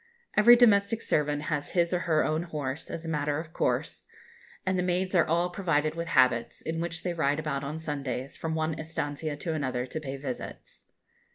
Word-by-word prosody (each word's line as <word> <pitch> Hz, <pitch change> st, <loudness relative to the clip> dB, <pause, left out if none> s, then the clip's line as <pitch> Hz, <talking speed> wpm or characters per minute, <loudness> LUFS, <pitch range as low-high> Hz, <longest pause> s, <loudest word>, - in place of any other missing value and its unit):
Every 235 Hz, +3 st, +8 dB
domestic 220 Hz, -2 st, +4 dB
servant 150 Hz, -6 st, 0 dB
has 150 Hz, -2 st, -2 dB
his 170 Hz, -1 st, +2 dB
or 180 Hz, -, +2 dB
her 160 Hz, -3 st, +2 dB
own 155 Hz, +1 st, 0 dB
horse, 150 Hz, -4 st, -4 dB
as 165 Hz, -, -5 dB
a -, -, -5 dB
matter 150 Hz, -2 st, 0 dB
of 160 Hz, 0 st, -6 dB
course; -, -, -1 dB, 0.6 s
and 185 Hz, -1 st, +1 dB
the -, -, +3 dB
maids 180 Hz, +1 st, 0 dB
are 175 Hz, -3 st, +4 dB
all 170 Hz, +2 st, +1 dB
provided 160 Hz, -5 st, +1 dB
with 170 Hz, 0 st, -4 dB
habits, 125 Hz, -7 st, +3 dB
in 165 Hz, +1 st, -3 dB
which 170 Hz, -1 st, -3 dB
they 180 Hz, -, -1 dB
ride 145 Hz, -3 st, +1 dB
about 150 Hz, -3 st, -2 dB
on 150 Hz, +3 st, -4 dB
Sundays, 140 Hz, -4 st, -4 dB
from 160 Hz, -1 st, -3 dB
one 160 Hz, 0 st, 0 dB
estancia 155 Hz, -1 st, -3 dB
to 165 Hz, +2 st, -3 dB
another, 130 Hz, -5 st, -1 dB
to 145 Hz, +5 st, -5 dB
pay 140 Hz, -3 st, -5 dB
visits. 135 Hz, -2 st, -7 dB
160 Hz, 195 wpm, -28 LUFS, 145-170 Hz, 0.6 s, Every